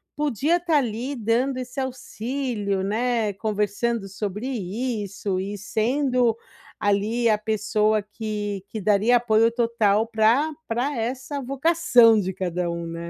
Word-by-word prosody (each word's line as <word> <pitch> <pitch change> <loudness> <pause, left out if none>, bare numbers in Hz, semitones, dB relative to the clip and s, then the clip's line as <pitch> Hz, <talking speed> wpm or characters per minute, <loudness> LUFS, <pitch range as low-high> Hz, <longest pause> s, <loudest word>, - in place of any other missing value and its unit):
podia 295 - +1
estar 335 -3 +1
ali 245 +2 -2
dando 245 +4 0
esse 255 +2 -6
auxílio, 245 -5 -3
né, 220 0 0
conversando 210 +1 -1
sobre 210 +4 -4
isso 205 -3 -3
e 200 +2 -4
sendo 245 +2 +1 0.4
ali 215 +4 +1
a 210 - +3
pessoa 215 0 +1
que 210 -2 -5
que 215 0 -6
daria 215 +4 +4
apoio 230 -1 +3
total 230 -2 +1
pra 230 +8 +3 0.2
pra 245 +4 -1
essa 260 +5 -3
vocação 270 -4 +4
de 190 -1 -2
cada 180 -1 -2
um, 170 0 -4
né? 170 0 -6
225 Hz, 130 wpm, -24 LUFS, 205-250 Hz, 0.4 s, daria